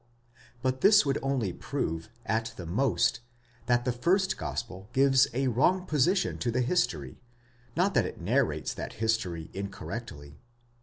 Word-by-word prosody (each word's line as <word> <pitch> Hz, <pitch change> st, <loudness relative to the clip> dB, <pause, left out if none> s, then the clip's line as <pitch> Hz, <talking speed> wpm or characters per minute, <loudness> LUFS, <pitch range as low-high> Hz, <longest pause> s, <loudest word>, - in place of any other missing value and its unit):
But 130 Hz, 0 st, 0 dB
this 200 Hz, -5 st, +6 dB
would 140 Hz, 0 st, 0 dB
only 130 Hz, -9 st, -1 dB
prove, 80 Hz, -1 st, -3 dB, 0.2 s
at 115 Hz, +1 st, -1 dB
the 90 Hz, -, -6 dB
most, 100 Hz, +2 st, +1 dB, 0.5 s
that 120 Hz, 0 st, +2 dB
the 125 Hz, -, +2 dB
first 185 Hz, +11 st, +1 dB
gospel 100 Hz, -3 st, -5 dB
gives 135 Hz, 0 st, +5 dB
a 130 Hz, +3 st, 0 dB
wrong 175 Hz, +10 st, +2 dB
position 175 Hz, +6 st, +1 dB
to 120 Hz, -, -1 dB
the 125 Hz, +2 st, +1 dB
history; 80 Hz, -, -1 dB, 0.6 s
not 185 Hz, +4 st, +2 dB
that 115 Hz, -7 st, +3 dB
it -, -, -9 dB
narrates -, -, 0 dB
that -, -, -6 dB
history 95 Hz, -8 st, -1 dB
incorrectly. 100 Hz, -7 st, -7 dB
120 Hz, 145 wpm, -29 LUFS, 95-135 Hz, 0.6 s, this